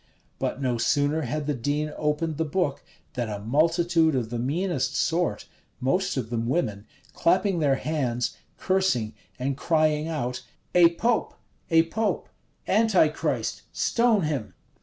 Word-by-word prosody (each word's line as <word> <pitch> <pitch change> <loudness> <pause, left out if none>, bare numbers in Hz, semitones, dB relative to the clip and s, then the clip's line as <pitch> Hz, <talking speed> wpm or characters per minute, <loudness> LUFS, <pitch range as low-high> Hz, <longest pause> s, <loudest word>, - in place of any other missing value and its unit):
But - - -2
no 125 -4 -1
sooner 145 +5 +2
had 150 +2 -3
the 150 - 0
dean 145 +4 -2
opened 150 +1 -1
the 160 - +1
book 155 -2 -1 0.3
than 120 -3 -2
a 105 - -3
multitude 160 - +2
of 120 -3 -2
the 120 - -2
meanest 155 +4 -1
sort, 165 -10 0 0.3
most 180 +7 0
of 120 -3 -3
them 115 -1 -1
women, 115 -8 -1 0.3
clapping 190 +1 +2
their 140 -3 +3
hands, 130 -5 -1 0.2
cursing, 185 - +1 0.2
and 135 +2 -1
crying 155 0 +1
out, 125 -6 -3 0.3
"A 170 -1 +6
pope, 230 +4 0 0.3
a 165 -1 +5
pope! 205 +4 -2 0.4
Antichrist! 195 -8 +2
stone 230 -5 +2
him!" 125 - -3
150 Hz, 140 wpm, -26 LUFS, 125-170 Hz, 0.4 s, A